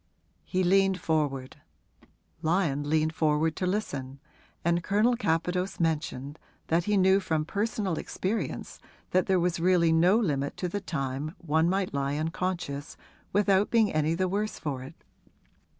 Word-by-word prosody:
He 185 0 -1
leaned 190 +1 +3
forward; 145 -6 -1 0.8
Lyon 155 -4 0
leaned 155 0 +2
forward 155 0 +1
to 185 - -1
listen, 140 -9 -3 0.5
and 170 0 +2
Colonel 215 +6 +3
Capadose 180 -2 -1
mentioned 150 -3 -2 0.3
that 170 +1 +2
he 210 -1 +2
knew 190 +1 +5
from 160 -5 -1
personal 200 -2 -1
experience 205 +5 -3 0.3
that 185 0 +2
there 190 -1 +3
was 175 -1 0
really 170 -1 +3
no 175 +6 +5
limit 145 -10 -1
to 180 - -2
the 205 +3 -3
time 145 -2 -3
one 160 0 +1
might 190 -2 -1
lie 140 0 -1
unconscious 160 -2 -3 0.3
without 200 0 +3
being 225 -3 +3
any 155 +1 +1
the 185 +2 0
worse 205 +3 -2
for 140 -5 -4
it. 130 - -10
170 Hz, 145 wpm, -28 LUFS, 155-190 Hz, 0.8 s, knew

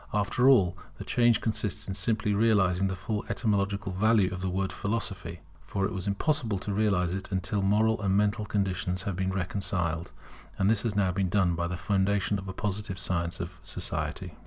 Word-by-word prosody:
After 115 +5 +3
all, 95 -10 +5 0.2
the - - -6
change 120 -2 +3
consists 110 -1 -1
simply 105 +2 0
in 100 - +1
realizing 100 -4 +3
the 95 - -2
full 105 +3 -3
etymological 100 -2 0
value 100 -1 +3
of 90 - -5
the 95 - -1
word 95 +1 -1
Philosophy. 100 -6 -3 0.3
For 95 -1 -1
it - - -2
was 95 +1 -4
impossible 110 +1 0
to 100 +2 -4
realize 95 -4 +1
it 95 +1 -5
until 95 +2 0
moral 110 +3 +2
and 100 -1 +2
mental 105 +1 +1
conditions 95 -2 -1
had 100 -2 -3
been 95 +1 -1
reconciled; 90 -3 -2 0.5
and 95 +2 +3
this 110 -2 +2
has 110 -3 -2
been 100 - +3 0.2
now - - -2
done 90 -2 +2
by 85 0 -1
the 90 0 -4
foundation 100 +1 +1
of 95 - -8
a - - -3
Positive 105 -1 -3
science 85 -1 0
of 90 +1 -6
society. 80 - -3
100 Hz, 190 wpm, -28 LUFS, 95-105 Hz, 0.5 s, all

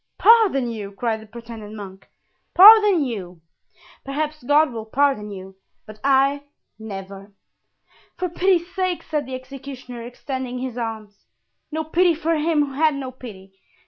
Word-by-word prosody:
"Pardon 415 - +5
you!" 205 -3 -7
cried 220 +1 -2
the 220 - -14
pretended 225 -1 -10
monk, 195 -2 -10 0.5
"pardon 410 -3 +8
you! 185 -9 -6 0.6
Perhaps 300 +2 -3
God 290 +2 +3
will 225 -1 -6
pardon 265 -4 +1
you, 190 -1 -10 0.3
but 215 0 -12
I, 275 +1 +3 0.4
never!" 195 -1 -9 0.8
"For 365 - -1
pity's 355 0 0
sake," 370 -2 -2
said 300 -4 -3
the 260 - -5
executioner, 255 -2 -9
extending 250 +1 -6
his 250 -1 -5
arms. 220 -4 -7 0.4
"No 315 +1 -2
pity 340 +2 +2
for 330 +1 0
him 305 -1 +1
who 275 - -9
had 310 +1 +2
no 265 -2 -5
pity! 200 -7 -12
260 Hz, 145 wpm, -22 LUFS, 220-310 Hz, 0.8 s, pardon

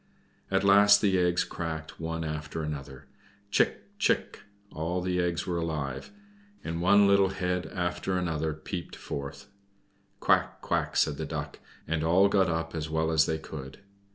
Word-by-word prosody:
At 95 0 +1
last 100 +1 +7
the 95 -3 +2
eggs 90 0 +2
cracked 80 -2 -6
one 80 0 -3
after 75 0 -4
another, 70 -3 -6 0.5
"Chick, - - +2 0.2
chick!" - - +1 0.3
All 85 +3 -2
the 90 0 0
eggs 85 -1 -1
were 85 -2 -1
alive, 75 -5 -3 0.5
and 85 +1 -3
one 100 +3 +6
little 100 -1 +5
head 90 -1 -2
after 90 +1 -2
another 80 -3 -1
peered 85 +3 -6
forth. 70 +9 -7 0.7
"Quack, - - +2
quack!" - - -1
said 75 - +2
the 80 - -3
Duck, 75 -2 -5 0.3
and 80 0 -1
all 90 +5 +4
got 95 -3 +3
up 80 0 -2
as 80 -1 -3
well 80 +1 0
as 80 -1 +4
they 80 - 0
could. 70 -3 -9
80 Hz, 155 wpm, -28 LUFS, 80-90 Hz, 0.7 s, last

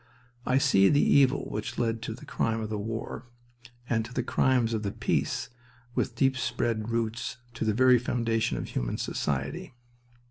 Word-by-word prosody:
I 130 - +3
see 100 -7 +5
the 145 - +4
evil 140 -1 +4
which 105 +1 -4
led 115 -1 0
to 115 -1 -4
the 130 - -12
crime 115 0 -1
of 110 -1 -4
the 105 - -1
war 115 +4 -5 0.6
and 115 -2 +1
to 115 - -10
the - - -1
crimes 125 -3 +2
of 110 - -1
the 100 - -2
peace - - -1 0.4
with - - -1
deep 135 -1 +2
spread 115 -4 -1
roots 115 0 -2 0.2
to 115 - -3
the 110 - +2
very 130 0 +6
foundation 115 -2 0
of - - -5
human - - -2
society. 70 - -3
115 Hz, 175 wpm, -28 LUFS, 110-125 Hz, 0.6 s, very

